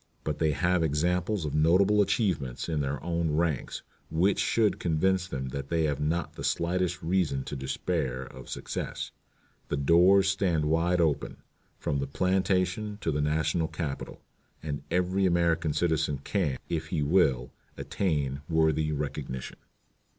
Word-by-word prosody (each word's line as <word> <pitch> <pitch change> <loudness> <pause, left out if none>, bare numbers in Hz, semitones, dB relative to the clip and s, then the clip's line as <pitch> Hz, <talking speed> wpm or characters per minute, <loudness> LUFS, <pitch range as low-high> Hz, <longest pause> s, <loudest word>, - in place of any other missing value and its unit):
But 75 -2 -3
they 80 - +3
have 90 +3 +1
examples 90 +5 0
of 75 - -3
notable 95 +7 +4
achievements 95 - 0
in 80 -3 -1
their 70 -1 -2
own 85 -2 0
ranks 80 -6 -1 0.3
which 90 +5 +2
should 110 -3 +2
convince 90 +3 +1
them 65 -6 -4
that 70 +1 -5
they 85 -1 +1
have 75 -3 0
not 80 +4 -1
the - - -8
slightest 90 0 0
reason 80 -6 +1
to 75 - -6
despair 65 -1 -2
of - - -11
success. - - -4 0.6
The 75 - -2
doors 90 +7 +5
stand 90 -5 +1
wide 85 +3 +2
open, 80 -4 0 0.3
from 70 - -1
the 70 - -2
plantation 95 +5 0
to 80 - 0
the 75 0 0
National 80 +2 +1
Capitol, 75 -5 -5 0.4
and 75 -2 -3
every 90 +2 +2
American 85 -3 +2
citizen 80 -2 +1
can, 85 -10 0
if 80 -2 -2
he 80 -6 -1
will, 70 -6 +2 0.3
attain 70 -7 -1
worthy 80 -1 +2
recognition." 70 -3 -4
80 Hz, 145 wpm, -28 LUFS, 75-90 Hz, 0.6 s, doors